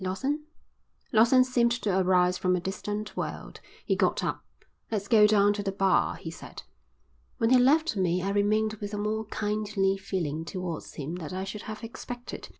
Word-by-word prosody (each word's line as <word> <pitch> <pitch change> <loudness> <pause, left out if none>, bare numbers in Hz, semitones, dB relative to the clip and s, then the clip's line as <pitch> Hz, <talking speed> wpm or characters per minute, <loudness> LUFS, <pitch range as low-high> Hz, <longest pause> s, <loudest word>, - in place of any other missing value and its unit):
Lawson?" 270 +11 -2 0.7
Lawson 235 +4 +6
seemed 245 -2 +2
to 215 -5 0
arise 180 -1 +3
from 180 0 +1
a - - 0
distant 205 +3 -4
world. - - -5 0.3
He - - +1
got - - +1
up. - - -2 0.5
"Let's 205 -3 -2
go 210 -1 +6
down 205 -1 +4
to 205 - -3
the 195 -1 -2
bar," 195 -1 +2
he 165 - -7
said. - - -10 0.7
When 230 -1 +1
he 255 - +7
left 300 +3 +3
me 180 -2 +1
I 195 - -1
remained 215 +2 +1
with 205 0 -4
a - - -4
more 215 +1 -2
kindly 210 -2 -1
feeling 170 -6 -3
towards 175 -1 -6
him 155 +4 -5
than 170 0 -6
I 190 - -3
should 205 +2 -6
have 215 +1 -7
expected. 240 +1 -8
205 Hz, 180 wpm, -28 LUFS, 185-220 Hz, 0.7 s, he